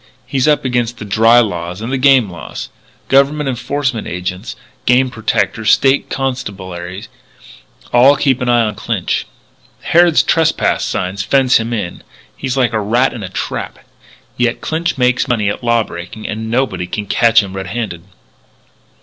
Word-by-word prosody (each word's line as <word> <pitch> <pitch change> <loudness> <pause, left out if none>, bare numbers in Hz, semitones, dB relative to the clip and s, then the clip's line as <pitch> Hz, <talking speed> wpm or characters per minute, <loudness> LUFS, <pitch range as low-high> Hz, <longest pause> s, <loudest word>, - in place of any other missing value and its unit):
He's 135 +1 0
up 150 -2 +2
against 120 -2 -1
the 105 - -7
dry 115 +4 +5
laws 90 -4 -3
and 115 +3 -5
the - - +1
game 130 -4 +5
laws. 85 -2 -8 0.4
Government 140 +2 +3
enforcement 130 -1 -2
agents, 90 +1 -5 0.3
game 125 +1 +3
protectors, 110 -1 -1
State 135 0 +3
Constabulary, 95 -8 -5 0.9
all 130 +4 +6
keep 135 -2 +1
an 125 - 0
eye 120 -1 +4
on 105 -1 -1
Clinch. - - -2 0.5
Harrod's 170 -1 +4
trespass 160 -1 +1
signs 95 +2 -2
fence 130 +4 +3
him 115 +1 -3
in. 105 -7 -4 0.3
He's 130 0 -3
like 125 -3 +2
a 110 - 0
rat 120 +6 +1
in 115 - -7
a 95 - -6
trap. 95 - -4 0.6
Yet 120 -1 0
Clinch 165 +1 -2
makes 125 +1 +2
money 110 -5 +1
at 100 - -5
law 115 -1 +2
breaking 90 +4 -8
and 110 +1 -4
nobody 120 -7 -1
can 105 +3 -4
catch 115 +1 +4
him 95 -1 -8
red 95 0 -5
handed. 95 -4 -4
115 Hz, 160 wpm, -16 LUFS, 100-130 Hz, 0.9 s, all